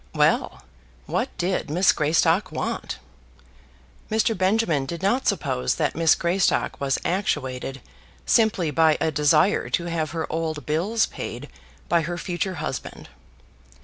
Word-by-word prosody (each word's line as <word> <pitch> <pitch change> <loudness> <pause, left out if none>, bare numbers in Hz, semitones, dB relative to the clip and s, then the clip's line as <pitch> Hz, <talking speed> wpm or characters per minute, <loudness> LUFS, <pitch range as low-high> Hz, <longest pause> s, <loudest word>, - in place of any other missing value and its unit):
Well; 60 - +1 0.4
what - - -1
did 180 -3 -1
Miss 175 +5 +4
Greystock 165 +4 +2
want? - - -3 1.1
Mr. 220 +1 +1
Benjamin 185 -7 +1
did 170 +4 -6
not 240 +7 +1
suppose 65 - 0
that - - 0
Miss 165 0 +4
Greystock 175 -2 0
was 135 -1 +1
actuated 135 -8 -2 0.4
simply 210 -8 +2
by 155 +1 +4
a 160 - +1
desire 150 +7 +3
to 170 - 0
have 165 -2 -2
her 165 -1 -3
old 160 -4 -3
bills 190 - +1
paid - - -7 0.4
by 170 0 +3
her 175 +2 -4
future 180 +1 -3
husband. 145 -4 -6
170 Hz, 130 wpm, -24 LUFS, 150-190 Hz, 1.1 s, Miss